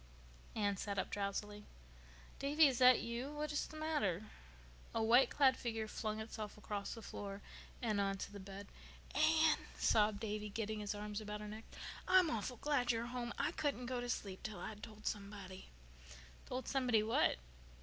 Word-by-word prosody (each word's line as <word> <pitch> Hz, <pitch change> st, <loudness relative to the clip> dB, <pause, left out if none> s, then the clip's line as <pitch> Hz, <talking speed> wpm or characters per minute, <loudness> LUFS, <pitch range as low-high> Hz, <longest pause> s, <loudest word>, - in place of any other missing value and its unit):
Anne 205 Hz, -2 st, +1 dB
sat 200 Hz, +1 st, -3 dB
up 190 Hz, -, -1 dB
drowsily. 205 Hz, +1 st, -2 dB, 0.8 s
"Davy, 290 Hz, +3 st, +5 dB
is 265 Hz, -4 st, +3 dB
that 255 Hz, -1 st, +8 dB
you? 235 Hz, +4 st, -3 dB
What 300 Hz, 0 st, -2 dB
is 295 Hz, -, 0 dB
the 310 Hz, -, -9 dB
matter?" 215 Hz, -, 0 dB, 0.7 s
A 225 Hz, -, +2 dB
white 240 Hz, +3 st, +6 dB
clad 265 Hz, -2 st, +5 dB
figure 225 Hz, -3 st, -2 dB
flung 215 Hz, 0 st, -3 dB
itself 220 Hz, -1 st, -5 dB
across 205 Hz, 0 st, -4 dB
the 225 Hz, -, -9 dB
floor 200 Hz, 0 st, -6 dB, 0.4 s
and 215 Hz, -3 st, +2 dB
on 195 Hz, 0 st, 0 dB
to 195 Hz, -, -5 dB
the 205 Hz, -, -8 dB
bed. 195 Hz, +1 st, -8 dB, 0.5 s
"Anne," 315 Hz, 0 st, +5 dB, 0.2 s
sobbed 210 Hz, -1 st, +3 dB
Davy, 210 Hz, -1 st, -3 dB
getting 215 Hz, 0 st, -2 dB
his 210 Hz, 0 st, -2 dB
arms 210 Hz, +1 st, -4 dB
about 210 Hz, 0 st, -4 dB
her 210 Hz, -, -5 dB
neck. 215 Hz, +2 st, -7 dB, 0.4 s
"I'm 365 Hz, -3 st, +6 dB
awful 235 Hz, +3 st, -2 dB
glad 255 Hz, -4 st, +2 dB
you're 230 Hz, 0 st, -1 dB
home. 240 Hz, 0 st, -3 dB
I -, -, +1 dB
couldn't 285 Hz, -6 st, -1 dB
go 250 Hz, 0 st, -2 dB
to 245 Hz, -, -4 dB
sleep 195 Hz, -5 st, -3 dB
till 215 Hz, -1 st, -5 dB
I'd 210 Hz, -1 st, -6 dB
told 215 Hz, -1 st, -10 dB
somebody." 200 Hz, -2 st, -5 dB, 0.8 s
"Told 255 Hz, +1 st, -3 dB
somebody 250 Hz, -5 st, +3 dB
what?" 220 Hz, -, +3 dB
220 Hz, 175 wpm, -38 LUFS, 205-250 Hz, 0.8 s, that